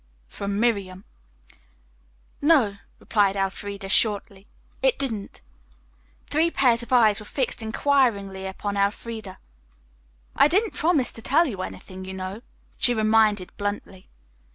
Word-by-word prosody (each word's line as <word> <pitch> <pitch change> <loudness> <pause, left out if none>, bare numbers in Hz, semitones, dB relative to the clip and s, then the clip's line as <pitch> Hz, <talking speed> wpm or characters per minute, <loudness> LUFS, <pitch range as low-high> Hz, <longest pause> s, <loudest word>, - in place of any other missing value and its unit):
from 200 - -4
Miriam. 200 -5 -1 1.4
"No," 280 -10 +3 0.2
replied 200 -2 +1
Elfreda 195 0 -3
shortly, 200 -2 +1 0.3
"it - - +2
didn't." 225 -7 -3 0.9
Three 315 +3 +2
pairs 245 -7 +2
of 235 - -9
eyes 225 -5 +5
were 210 - -10
fixed 260 -3 -2
inquiringly 220 -5 0
upon 200 +1 -4
Elfreda. 205 0 -3 1.0
"I - - +6
didn't 400 +7 +1
promise 310 -5 +1
to 225 - -11
tell 300 +9 +3
you 205 - -4
anything, 185 0 -8
you 190 0 -7
know," 190 +3 -6 0.4
she 245 - +3
reminded 215 -3 +2
bluntly. 205 -2 -5
210 Hz, 120 wpm, -24 LUFS, 195-245 Hz, 1.4 s, I